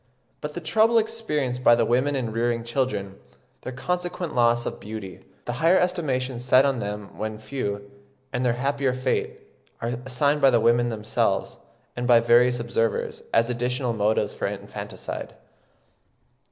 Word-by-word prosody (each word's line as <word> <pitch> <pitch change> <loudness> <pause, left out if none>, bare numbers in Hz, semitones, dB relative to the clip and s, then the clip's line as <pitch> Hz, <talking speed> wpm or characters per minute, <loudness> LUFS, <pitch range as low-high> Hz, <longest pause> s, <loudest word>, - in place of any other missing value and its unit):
But 150 0 -5
the 175 - -4
trouble 220 +8 +3
experienced 150 - -1
by 120 - +7
the 115 -1 +2
women 130 +5 +1
in 120 -4 -2
rearing 115 +1 0
children, 105 -6 -2 0.4
their - - -6
consequent 175 +4 -3
loss 120 -1 +3
of - - -4
beauty, 105 -3 -7 0.3
the 120 - -2
higher 170 +3 +5
estimation 135 -9 0
set 130 +2 +4
on 135 -3 +1
them 105 -1 -5
when 110 0 -3
few, 105 -3 -4 0.5
and 125 0 0
their 125 -2 +2
happier 135 +1 0
fate, 130 - -2 0.4
are 115 - -2
assigned 140 +3 +1
by 135 - +7
the 120 -2 +4
women 120 +1 +3
themselves, 110 -2 -1 0.4
and 120 0 -2
by 120 -2 +7
various 120 +1 +4
observers, 115 -1 -1
as 115 +1 +3
additional 125 0 -1
motives 110 0 +1
for - - -2
infanticide. - - -6
125 Hz, 155 wpm, -25 LUFS, 115-140 Hz, 0.5 s, by